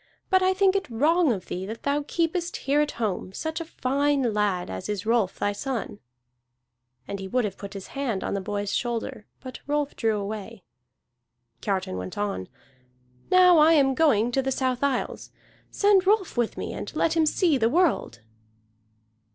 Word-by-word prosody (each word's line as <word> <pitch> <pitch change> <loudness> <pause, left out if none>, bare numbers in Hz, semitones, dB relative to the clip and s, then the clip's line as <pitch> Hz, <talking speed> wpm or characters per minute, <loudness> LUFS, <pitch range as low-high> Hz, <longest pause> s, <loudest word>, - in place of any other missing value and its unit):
But 375 0 +5
I 375 0 +2
think 390 0 +3
it 390 - -1
wrong 305 +6 +3
of 190 -5 -3
thee 180 - -5
that 225 +2 -7
thou 285 +1 0
keepest 340 +1 -1
here 285 +2 +3
at 300 - -1
home 200 -4 -3
such 315 - -4
a - - -5
fine 275 -4 0
lad 205 -4 0
as 95 - -6
is 205 -2 -3
Rolf 225 -4 +1
thy 205 - 0
son." 225 -1 -4 1.1
And 200 - -5
he 190 - -6
would 250 +4 +1
have 195 -2 -4
put 200 0 -9
his 195 - -7
hand 255 -9 -2
upon - - -2
the 200 - -1
boy's 205 0 -3
shoulder, 230 -3 -3
but 255 -1 -8
Rolf 290 0 -1
drew 220 -2 0
away. 205 0 -6 1.0
Kiartan 190 - -2
went 90 0 -7
on: 200 - -3 0.8
"Now 360 -2 +6
I 315 +2 +6
am 275 -4 +4
going 245 -6 +3
to 270 - +1
the 265 0 -2
South 255 -1 -1
Isles. 280 -3 -1 0.4
Send 400 -2 +3
Rolf 410 -3 +2
with 240 -2 -1
me, - - -4
and - - -6
let 330 - +1
him 320 -1 +3
see 315 -4 +2
the 225 -1 +3
world." 300 - +1
255 Hz, 180 wpm, -25 LUFS, 205-315 Hz, 1.1 s, Now